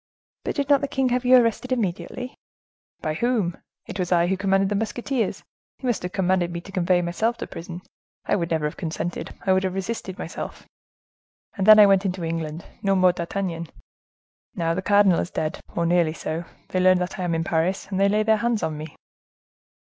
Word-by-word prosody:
"But - - -2
did 285 -2 -1
not 285 -1 +4
the 280 - -1
king 265 -1 0
have 250 +1 0
you 255 +1 +7
arrested 245 +1 +1
immediately?" 240 +3 -2 0.7
"By 155 - -1
whom? 210 -2 0 0.3
It 200 -3 -7
was 180 -1 -2
I 170 -1 +4
who 190 +2 +1
commanded 195 0 +2
the 205 - 0
musketeers; 225 +2 -2 0.3
he - - -9
must 245 -3 0
have 180 - -4
commanded 185 -2 +1
me 170 - -4
to 195 - -12
convey 180 -2 +2
myself 220 +8 0
to - - -5
prison; 175 +1 -8 0.4
I - - +2
would 170 -4 -1
never 160 -2 0
have 150 - -3
consented: 170 0 -4
I 190 - +4
would 190 0 +2
have 185 -1 -2
resisted 195 -1 -4
myself. - - -6 0.9
And 195 -2 -1
then 215 0 +10
I 210 - +9
went 195 -1 +4
into 185 -2 -2
England—no 165 +4 -2
more 185 -1 +5
D'Artagnan. 170 -1 -3 0.9
Now, 165 -1 0
the 185 - -2
cardinal 200 -2 +4
is - - -2
dead, 155 -3 -3 0.2
or 170 - +1
nearly 170 -2 +2
so, 165 +1 -4 0.2
they 185 - 0
learn 185 0 +5
that 180 +1 -3
I - - -1
am 170 -2 0
in 165 - 0
Paris, 170 +4 0
and 190 - -1
they 200 0 +4
lay 210 +1 +2
their 220 0 +3
hands 235 0 0
on 155 -1 -2
me." 155 +1 -8
185 Hz, 205 wpm, -24 LUFS, 170-215 Hz, 0.9 s, then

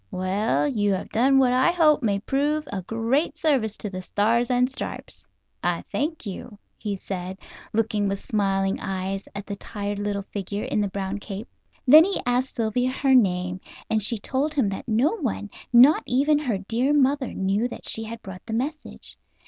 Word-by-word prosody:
Well, 190 - 0
you 205 -7 +1
have 190 - -4
done 265 +4 +4
what 255 -2 +4
I 260 +6 +4
hope 315 -4 +4
may 205 -5 +1
prove 285 +7 -1
a 195 - -2
great 230 - 0
service 265 -10 +1
to - - -5
the 185 -1 -5
Stars 225 +6 +1
and 250 0 +3
Stripes. 265 - -6 0.3
I - - -1
thank 310 -1 -2
you," 205 +2 -7 0.2
he 210 -2 -4
said, 185 -1 -5 0.3
looking 215 -2 0
with 195 0 -1
smiling 195 -2 0
eyes 195 +1 -3
at 200 0 -5
the 200 - -5
tired 205 0 -5
little 205 -1 -2
figure 200 +1 -5
in 210 - 0
the 205 - +1
brown 195 +1 -4
cape. 205 +2 -7 0.4
Then 300 +5 +9
he 390 +2 0
asked 250 +2 0
Sylvia 240 +2 0
her 265 +1 +1
name, 185 -6 +2 0.3
and 220 -1 +2
she 225 +3 +3
told 275 +8 -1
him 255 -8 +2
that 195 - -6
no 235 +7 +3
one, 210 - -3 0.2
not 255 +6 +7
even 290 +4 +3
her 250 -9 -1
dear 230 +8 0
mother, 275 -1 +2
knew 195 +5 +1
that - - -7
she 225 - +1
had 230 +1 -8
brought 185 -1 -9
the 225 - -4
message. 290 +6 -4
225 Hz, 185 wpm, -24 LUFS, 200-265 Hz, 0.4 s, Then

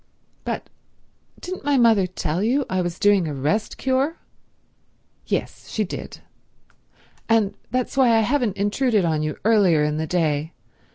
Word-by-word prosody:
"But—didn't 370 +1 -9
my 285 -1 +2
mother 225 -6 +4
tell 170 -1 -3
you 255 +6 +1
I 185 0 -1
was 175 -1 -3
doing 200 -4 +3
a 150 - -4
rest 155 +11 -1
cure?" 265 +5 0 1.1
"Yes. - - -3
She 215 - -1
did. 190 - -7 1.1
And 220 -3 +3 0.2
that's 255 +2 -2
why 250 -4 +4
I - - +4
haven't 235 -3 0
intruded 205 0 +1
on 155 -2 0
you 155 -1 -3
earlier 195 -9 +4
in 150 0 0
the 160 0 -2
day. 155 -2 0
205 Hz, 145 wpm, -22 LUFS, 165-245 Hz, 1.1 s, mother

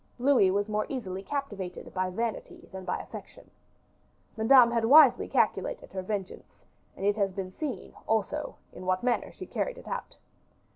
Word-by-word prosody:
Louis 250 -6 +4
was 200 +2 0
more 215 0 -1
easily 195 -8 -4
captivated 205 -8 -5
by 185 0 -1
vanity 225 +4 -4
than 190 -1 -7
affection. - - -7 0.8
Madame 235 +2 +6
had 230 -1 +1
wisely 280 +1 +7
calculated - - 0
her 190 - -3
vengeance, 195 0 -6 0.3
and 195 - -4
it 205 +1 +2
has 200 -2 +1
been 185 0 -5
seen, 280 +5 -5
also, 220 -2 -1 0.2
in 185 - -9
what 185 +2 +1
manner 245 -1 0
she - - -9
carried - - -3
it - - -12
out. - - -5
210 Hz, 155 wpm, -29 LUFS, 190-245 Hz, 0.8 s, wisely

